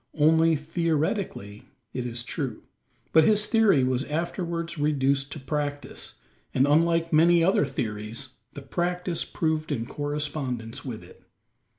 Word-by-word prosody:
Only 160 +2 +5
theoretically, 155 - -2 0.2
it 125 -1 -3
is 120 0 -3
true; 130 -4 -4 0.5
but 160 - +7
his 210 +3 +4
theory 215 - +4
was 130 0 +1
afterwards 170 +1 -3
reduced 140 -2 +1
to - - -7
practice; 145 +1 -3 0.4
and, 130 - +4
unlike 165 +3 +2
many 170 +2 +5
other 175 -5 +3
theories, 115 0 -4 0.2
the 140 - -8
practice 175 +4 -1
proved 155 -1 -1
in 115 -5 -1
correspondence 145 -5 -3
with 115 -8 -6
it. 90 - -16
150 Hz, 125 wpm, -26 LUFS, 130-165 Hz, 0.5 s, but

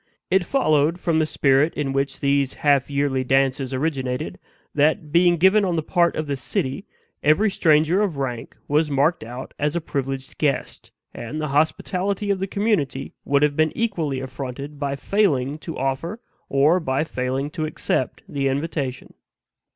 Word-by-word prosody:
It 190 0 +4
followed, 165 - +2
from 165 -2 +1
the 155 - +1
spirit 140 +2 +2
in 135 -2 -2
which 135 0 -1
these 140 -1 +1
half 140 -2 +4
yearly 140 -2 0
dances 135 0 +1
originated, 130 -2 -2 0.3
that, 150 +1 +1
being 175 +1 +4
given 190 +5 +5
on 180 -3 0
the 160 - -1
part 170 +1 +2
of 155 - -2
the 145 -1 -2
city, 130 - -3 0.3
every 195 +8 +3
stranger 160 +2 +3
of 190 -8 -1
rank 125 -4 -4
was 150 +2 +2
marked 145 +3 +1
out 125 +3 -8
as 150 +2 0
a - - +2
privileged 135 -3 -4
guest, 145 -3 -2 0.2
and 145 +7 -6
the 150 -1 -2
hospitality 185 +7 0
of 195 - 0
the 195 - -2
community 185 -11 -1
would 140 +1 +2
have 150 -1 +2
been 155 0 +2
equally 170 - -1
affronted 135 +2 -6
by 140 -1 -1
failing 150 -6 +1
to 165 0 -7
offer 135 - -2 0.3
or 145 +6 +4
by 135 -3 0
failing 135 -1 -2
to 155 -1 -3
accept 140 -4 -2
the 140 -1 -1
invitation. 135 -2 -3
145 Hz, 165 wpm, -23 LUFS, 135-165 Hz, 0.3 s, given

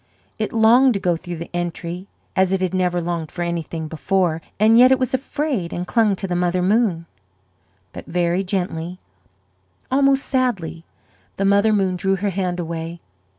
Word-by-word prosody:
It - - -1
longed 235 +2 +5
to - - 0
go 175 -2 +1
through 175 +1 -6
the 170 +1 -8
entry 175 +1 -4 0.3
as 190 0 +3
it 190 - +1
had 185 -1 -1
never 180 -1 +1
longed 170 -2 -3
for 175 - -3
anything 165 -2 -3
before; 165 +1 0 0.2
and 220 +2 +6
yet 255 +1 +7
it 265 - +5
was 255 -1 -2
afraid 260 - -2
and 175 - -3
clung 215 0 +2
to 195 - -5
the 180 - -2
Mother 180 0 +1
Moon. 195 -4 +1 0.9
But - - -9
very 175 +2 0
gently, 180 -2 -3 0.9
almost 275 0 +3
sadly, 205 -11 -1 0.5
the 195 - -1
Mother 200 +2 +4
Moon 190 -3 +1
drew 195 +1 +1
her 200 +1 -1
hand 180 -1 -2
away. 165 0 -5
185 Hz, 170 wpm, -21 LUFS, 170-215 Hz, 0.9 s, yet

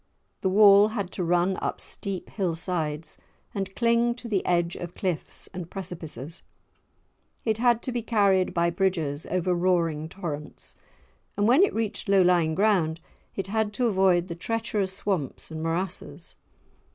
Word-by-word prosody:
The 190 - +1
wall 200 +1 +7
had 205 -4 -4
to 180 - -3
run 175 +2 +2
up - - -2
steep 195 -2 -5
hill 185 -6 -1
sides 160 -3 -3 0.3
and 195 -1 -4
cling 235 0 +2
to 245 -1 -8
the 200 -5 0
edge 175 -1 +1
of 175 0 -7
cliffs, 180 -5 -3
and 180 -2 -6
precipices; 165 - -6 1.0
it 220 -1 +1
had 240 -1 +3
to 255 - -2
be 240 -1 -2
carried 200 -5 +2
by 170 0 +1
bridges 165 -5 -1
over 185 0 +1
roaring 170 -3 +1
torrents, 155 -5 -6 0.6
and 205 +1 +2
when 260 +8 +6
it 395 - +3
reached 220 -2 -2
low 195 -1 +5
lying 170 -3 +3
ground 180 -5 +2 0.4
it 195 - -2
had 210 +1 -1
to 245 +4 0
avoid 190 -4 +3
the 170 - -4
treacherous 210 +1 -2
swamps 180 -8 -3
and 160 0 -5
morasses. 165 +4 -3
185 Hz, 155 wpm, -26 LUFS, 170-210 Hz, 1.0 s, wall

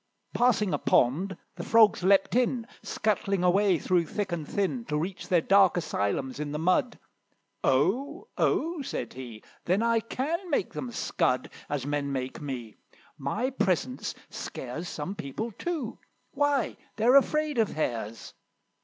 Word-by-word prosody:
Passing 225 -5 +3
a - - 0
pond, 170 +10 +2 0.2
the 170 - -4
Frogs 220 -2 +5
leaped 195 +1 +4
in, 245 -1 +2 0.2
Scuttling 200 -3 0
away 190 +1 +4
through 175 0 +1
thick 200 +2 -3
and 160 -4 -3
thin, 200 +5 -1
To 150 - -1
reach 175 +4 -4
their 175 -2 +3
dark 195 0 +5
asylums 130 -3 -1
in 150 -1 -3
the - - -1
mud. 175 +4 +1 0.7
"Oh! 255 - +1
oh!" 330 0 +1
said 270 - -4
he, 120 -4 -9 0.2
"then 190 +5 +2
I 230 0 +3
can 305 - -3
make 290 - 0
them 250 - -4
scud 130 - 0 0.2
As 145 -3 -2
men 145 -1 -1
make 130 +2 -4
me; 125 -6 -6 0.4
my 210 - -1
presence 170 - -1 0.2
scares 145 +8 -6
Some 160 +6 -4
people 205 - -5
too! 300 - -4 0.3
Why, 290 -2 +1 0.2
they're 235 +4 +4
afraid 300 0 +3
of 220 - +2
Hares! 115 -7 -3
190 Hz, 145 wpm, -28 LUFS, 145-235 Hz, 0.7 s, Frogs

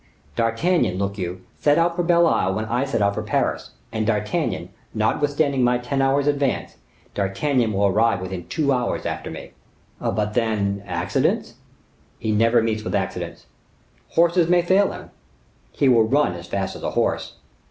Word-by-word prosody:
D'Artagnan, 115 - +1
look 100 +1 -2
you, 90 0 -4 0.2
set 145 0 +3
out 170 0 +2
for 175 - 0
Belle 170 0 +4
Isle 95 - +1
when 110 - -2
I 120 +4 0
set 115 -6 0
out 100 0 +2
for 110 - -3
Paris; 105 - -1 0.2
and 110 -1 -2
D'Artagnan, 105 -2 -1 0.3
notwithstanding 145 -2 +1
my 125 0 +3
ten 125 +3 -2
hours' 135 +1 +2
advance, 145 -2 -1 0.4
D'Artagnan 110 +5 0
will 100 0 +1
arrive 105 +1 +2
within 90 -1 -6
two 145 -4 +1
hours 125 -2 -1
after - - -4
me." - - -9 0.5
"But, 105 0 -1
then, 105 -4 0
accidents?" - - 0 0.6
"He 110 - -2
never 115 +2 +3
meets 110 -1 -1
with - - -2
accidents." - - -4 0.7
"Horses 170 0 +4
may 175 -1 +4
fail 190 +3 +3
him." - - -10 0.6
"He 140 - +1
will 120 -3 +6
run 140 -2 +2
as 85 0 -9
fast 95 +1 -3
as - - -9
a - - -2
horse." - - -1
115 Hz, 165 wpm, -22 LUFS, 100-145 Hz, 0.7 s, will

